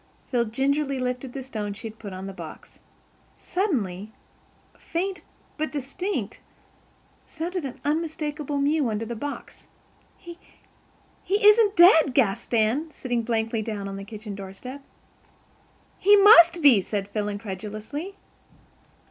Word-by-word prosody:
Phil 240 -2 0
gingerly 275 +4 0
lifted 250 0 -3
the 270 - -5
stone 215 -5 -5
she 205 - -8
had 220 0 -12
put 205 -3 -8
on 185 +1 -7
the 195 - -6
box. 170 -4 -11 0.6
Suddenly, 220 - -2 0.6
faint 365 +1 -4 0.4
but 310 +1 -2
distinct, 280 - -4 0.9
sounded 340 0 -4
an 260 - -7
unmistakable 300 -1 -2
mew 285 -2 +1
under 220 +1 -2
the 235 +1 -5
box. 285 +6 -7 0.5
"He—he 385 +3 -5
isn't 420 -1 +6
dead," 320 -6 +6
gasped 235 -2 +1
Anne, 230 +9 +1
sitting 245 -5 -3
blankly 225 -1 -1
down 210 -2 -4
on 195 - -6
the 195 - -7
kitchen 210 0 -8
doorstep. 200 +8 -9 1.2
"He 410 +1 +6
must 345 -5 +7
be," 250 -9 +7
said 200 +1 -3
Phil 205 0 -3
incredulously. 215 - -6
255 Hz, 125 wpm, -25 LUFS, 215-320 Hz, 1.2 s, must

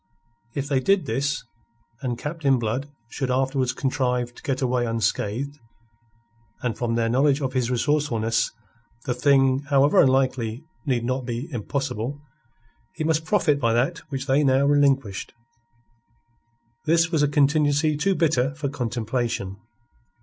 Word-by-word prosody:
If 140 0 -2
they 140 -2 +2
did 195 +8 +2
this, 140 +5 -1 0.6
and 125 -3 -2
Captain 150 -2 0
Blood 120 +5 -2 0.2
should 130 +2 -4
afterwards 130 0 +1
contrive 125 -3 -1
to - - -15
get 135 -2 -2
away 125 -2 +1
unscathed 115 +5 -1 1.0
and 120 -3 -1
from 115 0 -1
their 115 -1 +1
knowledge 135 +4 +3
of 135 -3 -2
his 125 -2 0
resourcefulness, 120 -4 +1 0.5
the 125 - 0
thing, 135 +1 +3
however 140 +1 +5
unlikely, 130 -2 +1 0.2
need 120 -3 0
not 130 0 -2
be 120 +4 -3
impossible 130 +1 -3 0.8
he - - -3
must 160 0 +1
profit 160 -7 +2
by 115 -4 +2
that 135 +9 +1
which 135 -2 -4
they 145 +1 +3
now 135 0 +3
relinquished. 140 -8 +1 1.5
This 165 +1 +3
was 160 -4 +2
a 145 - +4
contingency 145 +1 +2
too 190 +6 +1
bitter 140 -5 +1
for 150 -2 -3
contemplation. 120 -6 -2
135 Hz, 135 wpm, -24 LUFS, 120-145 Hz, 1.5 s, however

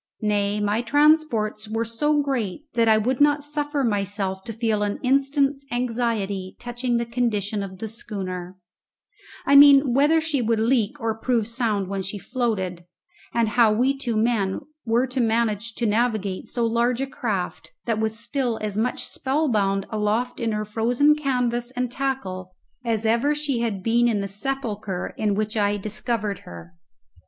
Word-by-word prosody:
Nay, 205 0 +1
my 210 +2 +1
transports 245 -6 +2
were 225 +1 -1
so 295 +6 +1
great 265 -3 -2
that 230 -1 +2
I 220 -1 +6
would 245 +5 0
not 290 0 +4
suffer 290 -1 -2
myself 200 -3 -1
to - - -5
feel 225 -1 0
an 205 0 -1
instant's 275 +1 +2
anxiety 230 -6 -2
touching 240 0 -2
the 235 - -1
condition 220 -4 -1
of 190 -1 -6
the 220 - -5
schooner 185 -5 -6 0.9
I 280 - +4
mean 280 -2 +8
whether 295 +5 +4
she 315 -4 -1
would 225 -1 +1
leak 235 +3 +1
or 225 -2 -1
prove 235 -2 +1
sound 225 -4 -1
when 195 0 -3
she 195 +2 -5
floated 195 -7 -2 0.5
and 230 -2 +1
how 225 0 +4
we 255 +5 +2
two 245 -5 -2
men 215 -4 +1 0.2
were 235 +2 +2
to 255 0 -2
manage 225 -1 0
to 235 - -1
navigate 215 -3 0
so 240 -1 -1
large 235 +2 +1
a 270 - 0
craft, 220 -9 -4 0.2
that 225 -2 0
was 220 0 0
still 245 -1 -1
as 210 -2 -3
much 230 +4 -1
spellbound 220 -9 0
aloft 220 +3 -1
in 230 -1 0
her 215 0 -2
frozen 240 +7 +3
canvas 250 -5 -1
and 250 -1 -1
tackle 190 -10 -3 0.3
as 225 -2 -1
ever 235 +7 +2
she 295 -4 -1
had 215 -5 -2
been 235 +2 +3
in 220 -3 +1
the 200 - -2
sepulchre 210 -3 -3
in 210 -2 0
which 215 +1 -2
I 205 -1 +1
discovered 215 0 -3
her. 85 0 -11
230 Hz, 165 wpm, -24 LUFS, 210-250 Hz, 0.9 s, mean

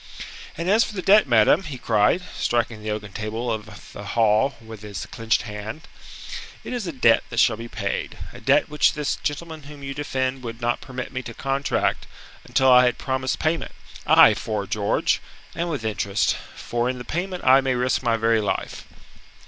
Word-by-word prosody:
"And 170 +2 -3
as 215 +4 +5
for 210 - -6
the 185 - -4
debt, 200 -2 +6
madam," 120 - +5
he 150 -8 -7
cried, 110 - +2
striking 115 -2 -1
the 110 - -5
oaken 105 -2 -4
table 110 +3 -3
of 110 -2 -7
the - - -8
hall 110 +3 +2
with 110 -2 -11
his 100 -6 -6
clenched 115 +1 0
hand, 110 +6 -7 0.8
"it - - -6
is 235 -6 -3
a - - -2
debt 120 -5 +4
that 120 - -2
shall 115 - +4
be 115 +2 -8
paid, 100 -4 -4 0.2
a - - -11
debt - - +3
which 150 0 +2
this 150 -2 -2
gentleman 155 +2 -4
whom 145 -2 -11
you 135 0 -4
defend 135 -2 -2
would 115 -2 -7
not 120 0 -1
permit 130 0 -7
me 125 - -3
to 120 -2 -9
contract 135 +1 -1 0.4
until 130 -1 +3
I 125 0 +7
had 125 - +1
promised 130 -1 -2
payment 160 +1 -1 0.3
aye, - - +8
'fore 105 -2 -3
George! 100 +2 0 0.3
and 170 +1 -2
with 140 -8 -3
interest, 100 -2 0 0.2
for 120 +1 -2
in 130 - -3
the 125 - -8
payment 180 +2 -3
I 130 +1 +6
may 130 -1 0
risk 125 +1 +1
my 115 -2 +1
very 115 0 +2
life." 105 - -3
125 Hz, 190 wpm, -23 LUFS, 110-145 Hz, 0.8 s, aye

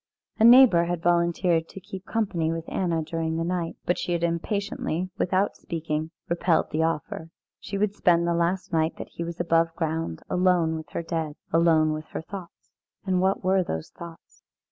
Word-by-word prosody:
A - - +4
neighbour 235 -8 +8
had 175 -1 -3
volunteered 170 -1 +2
to - - -9
keep 190 +2 -9
company 185 -8 0
with 165 0 -4
Anna 170 -4 -1
during 160 0 -2
the 165 - 0
night, 170 -1 -2
but 175 - +1
she 175 - -2
had 170 0 -1
impatiently, 185 0 -2
without 190 +2 +1
speaking, 160 -2 -3 0.2
repelled 170 0 +1
the 155 +1 0
offer. 160 0 -2 0.3
She 200 - -5
would 205 0 +1
spend 170 -4 +3
the 170 - +1
last 170 +2 -1
night 160 0 +1
that - - -7
he 170 - -6
was 170 0 -6
above 165 -1 +2
ground 160 - -3
alone 180 -3 +2
with 160 -2 -7
her - - -2
dead 160 -3 -3 0.2
alone 160 -2 +4
with 155 0 -5
her - - -3
thoughts. 190 -1 -10 0.3
And 185 -2 +1
what 190 +1 +1
were 190 +1 +3
those 80 - -5
thoughts? 170 -1 -12
170 Hz, 185 wpm, -26 LUFS, 165-185 Hz, 0.3 s, neighbour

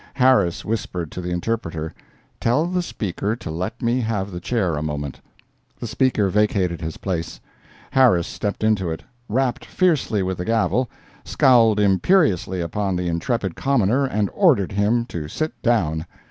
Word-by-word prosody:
Harris 125 -10 +3
whispered 95 -7 -3
to 90 - -5
the 90 - -4
interpreter: 85 -4 -3 0.5
"Tell 125 +8 +2
the 180 +1 0
Speaker 105 - -3
to 100 - -7
let 95 +10 -4
me 120 +2 +2
have 105 -4 -2
the 90 - -5
chair 95 -4 0
a 75 - -3
moment." 75 -3 -4 0.6
The - - -5
speaker 125 -6 +1
vacated 95 -4 +1
his 80 -1 -5
place; 85 -4 -4 0.5
Harris 115 -11 +4
stepped 105 0 -4
into 105 -5 +2
it, 80 - -5 0.3
rapped 125 +2 0
fiercely 155 - +1
with 95 -1 -3
the 90 - -3
gavel, 115 +2 +1 0.3
scowled 115 -5 +4
imperiously 95 - +2
upon 95 +3 -1
the 90 0 -1
intrepid 95 +3 -1
commoner 135 0 +2
and 105 -5 -1
ordered 140 - +3
him 105 +4 +1
to 80 -9 -5
sit 155 - -3
down. 85 - +1
105 Hz, 155 wpm, -22 LUFS, 90-120 Hz, 0.6 s, Harris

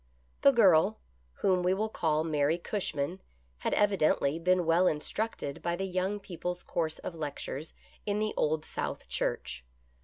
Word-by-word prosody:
The 280 - +7
girl, 200 -4 +5 0.3
whom 185 - +1
we 180 +1 +2
will 215 +3 0
call 155 -7 0
Mary 155 0 +1
Cushman, 175 -3 -2 0.4
had - - -1
evi 205 -2 +3
dently 155 +1 +2
been 180 0 +3
well 170 +3 +4
instructed 155 -1 -2
by 170 0 -1
the 190 +2 -2
Young 190 +2 -1
People's 180 -2 -5
Course 160 -2 -2
of - - -6
Lectures 150 -1 -5 0.3
in 205 0 -1
the 215 0 0
Old 155 +1 0
South - - -3
Church. - - -2
175 Hz, 155 wpm, -30 LUFS, 155-195 Hz, 0.4 s, The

